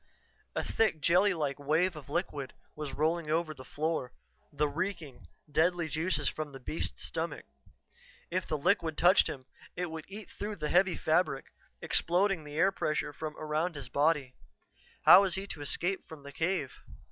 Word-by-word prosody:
A - - 0
thick 215 -8 +1
jelly 180 +6 +4
like 150 -5 -2
wave 160 +5 +1
of 145 -3 -10
liquid 145 -4 -3 0.2
was 150 -2 -5
rolling 160 +1 0
over 160 0 0
the 130 -3 -11
floor 150 0 -2 0.4
the 150 +1 +1
reeking, 160 -4 -4 0.2
deadly 170 +2 +2
juices 155 -3 0
from 155 +1 -3
the 135 - -9
beast's 155 +5 -3
stomach. - - -3 0.9
If 185 +1 -1
the 155 - -1
liquid 165 0 +1
touched 180 +3 +6
him, 130 -3 -6 0.3
it 180 -2 -3
would 160 -1 -6
eat 205 +2 -9
through 210 +1 -5
the 150 -5 -3
heavy 180 0 +3
fabric, 155 -4 0 0.3
exploding 180 0 +2
the 145 0 -8
air 185 +5 +4
pressure 155 -4 -1
from 155 +1 -6
around 155 +3 -1
his 140 - -6
body. 145 -3 +1 0.7
How 190 - +10
was 190 -3 0
he 190 +1 -3
to 160 -6 -6
escape 175 +6 -1
from 155 -3 -11
the 140 - -9
cave? 160 -2 -2
160 Hz, 170 wpm, -31 LUFS, 145-180 Hz, 0.9 s, How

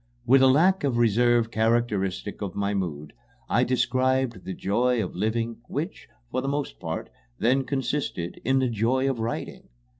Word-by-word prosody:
With 130 +2 +6
a 135 - +7
lack 170 +8 +4
of 135 -4 +1
reserve 120 0 +3
characteristic 110 -4 0
of 100 -4 -4
my 100 0 -1
mood, 75 -7 -4 0.3
I 120 - +2
described 130 -3 +1
the 95 - -4
joy 120 +4 +1
of - - -6
living, 115 +4 -1
which, 150 +4 -5 0.2
for 130 - -1
the 135 - -4
most 140 0 -3
part, - - -5 0.3
then 130 +4 +2
consisted 135 -10 -3
in 130 +2 +2
the 130 -1 +2
joy 120 +4 +1
of 135 -3 -1
writing. 115 +1 -4
120 Hz, 160 wpm, -26 LUFS, 110-130 Hz, 0.3 s, a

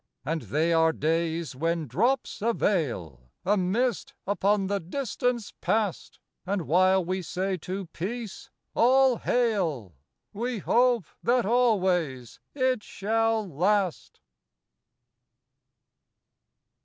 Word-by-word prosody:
And 160 +2 -1
they 155 - 0
are 160 0 +4
days 165 -2 -1
when 165 +3 -1
drops 225 - 0
a 230 +2 +2
veil 90 - -2
— - - -46
A 205 +3 +3
mist 240 +8 -1
upon 200 +1 +1
the 200 +1 -1
distance 240 +3 -2
past; 215 -4 -1 0.3
And 195 -1 -2
while 185 +4 +3
we 185 +2 -2
say 185 +3 -2
to 185 +3 -5
peace 205 +6 -6
— - - -56
" - - -54
All 260 +1 +4
hail! 180 - 0 0.2
" - - -54
We 240 +3 -2
hope 240 0 +2 0.2
that 245 -1 +2
always 185 - +1 0.2
it 255 -4 +1
shall 225 +2 0
last. 185 +3 -1
195 Hz, 120 wpm, -27 LUFS, 165-230 Hz, 0.3 s, are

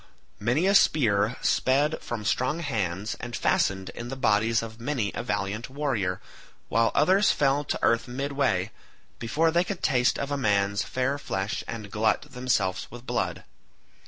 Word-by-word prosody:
Many 125 - +1
a 195 - +4
spear 115 - +3
sped 145 +4 +2
from 110 -3 -5
strong 130 +9 0
hands 105 - -2
and 120 0 -6
fastened 95 -1 +1
in 120 - -7
the 135 - -5
bodies 115 -2 +2
of 115 0 -9
many 120 -6 -1
a - - -3
valiant 105 +1 -3
warrior, 130 -10 -1 0.5
while 115 +1 +3
others 190 +7 +4
fell 140 0 +2
to - - -1
earth 115 0 +2
midway, 130 -6 -1 0.5
before 150 +8 +1
they 170 +2 +3
could 190 -1 -5
taste 125 -1 +2
of 140 +1 -2
man's 100 -3 +1
fair 135 +3 -1
flesh 95 -6 -3
and 110 -3 -6
glut 110 0 +1
themselves 125 -8 0
with 120 0 -11
blood. - - -2
120 Hz, 155 wpm, -26 LUFS, 105-140 Hz, 0.5 s, a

